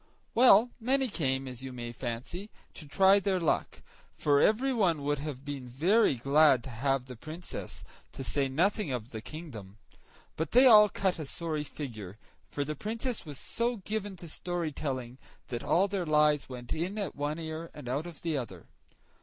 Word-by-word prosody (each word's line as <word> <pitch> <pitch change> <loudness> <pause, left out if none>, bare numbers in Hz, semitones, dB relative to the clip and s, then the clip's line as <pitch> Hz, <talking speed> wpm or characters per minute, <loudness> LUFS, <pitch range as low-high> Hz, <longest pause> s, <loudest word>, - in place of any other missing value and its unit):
Well, 240 -1 +6
many 265 +3 +1
came, 135 - -1
as 125 -1 -7
you 135 - -6
may 120 -1 -6
fancy, 125 - -5 0.2
to 150 - -9
try 195 +6 +5
their 195 -2 0
luck, 165 - -1 0.3
for 145 -1 +3
everyone 215 - +2
would 145 0 0
have 140 -2 -6
been 140 -3 -6
very 170 - +3
glad 140 0 +4
to 130 - -8
have 135 +2 0
the 130 -1 -9
Princess, 155 +9 -8 0.3
to 135 - -6
say 135 +1 0
nothing 180 +4 +1
of 125 -1 -4
the 110 - -6
kingdom; 115 - -9 0.6
but 160 - -3
they 250 +3 +7
all 210 -4 +9
cut 190 -3 -1
a 155 - -4
sorry 155 -1 -3
figure, 110 -11 -7 0.3
for 145 - -3
the 150 - -3
Princess 225 - -4
was 145 -2 -6
so 235 - -1
given 205 0 -4
to 175 -1 -10
storytelling, 145 -7 -4 0.3
that 120 -1 -4
all 190 +4 +3
their 190 -3 -2
lies 150 -2 +3
went 125 -2 -6
in 180 +6 -3
at 200 -3 -3
one 145 +2 -2
ear 160 0 -5
and 145 -5 -9
out 140 +7 -2
of 170 -3 -11
the 165 -2 0
other. 100 - -5
150 Hz, 180 wpm, -30 LUFS, 130-190 Hz, 0.6 s, all